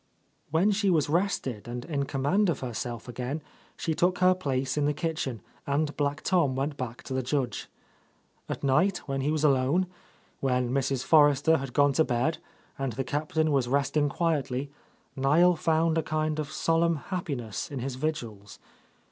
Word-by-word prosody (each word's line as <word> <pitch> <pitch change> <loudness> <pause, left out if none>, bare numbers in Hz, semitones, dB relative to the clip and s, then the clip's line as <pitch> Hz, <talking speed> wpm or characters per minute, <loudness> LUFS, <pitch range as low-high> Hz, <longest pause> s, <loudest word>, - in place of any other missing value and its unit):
When 170 +7 +3
she 200 0 +1
was 155 -5 +2
rested 150 - -1
and 120 +1 -5
in 145 -4 -1
command 145 +10 +1
of 160 - -1
her 125 -2 -4
self 120 +1 -5
again, 125 +5 -4 0.4
she 160 - -1
took 180 +4 +2
her 185 0 +5
place 135 -7 -2
in 150 -1 +1
the 145 0 +1
kitchen, 155 - -3 0.3
and 145 +1 0
Black 145 +1 -1
Tom 170 -8 +2
went 140 +2 -2
back 125 -3 -6
to 130 - -6
the 130 - 0
Judge. 130 0 -2 0.8
At - - -4
night, 175 +8 +3
when 135 -1 -1
he 140 - 0
was 155 0 0
alone, 140 +5 +3 0.5
when 125 -2 0
Mrs. 135 -1 0
For 150 -2 +7
rester 145 +3 +3
had 135 -2 -6
gone 145 -1 +4
to 160 - +4
bed 130 +4 0 0.4
and 135 -3 -2
the 135 +4 -2
Captain 155 +3 0
was 135 -4 +2
rest 140 +3 0
ing 145 -1 +3
quietly, 140 -4 -1 0.4
Niel 155 +6 +4
found 160 0 +2
a - - +2
kind 155 0 -1
of 150 - -3
solemn 165 0 +2
happiness 140 - -4
in 140 - -6
his 130 +1 -3
vigils. 120 -8 -4
145 Hz, 180 wpm, -28 LUFS, 130-160 Hz, 0.8 s, For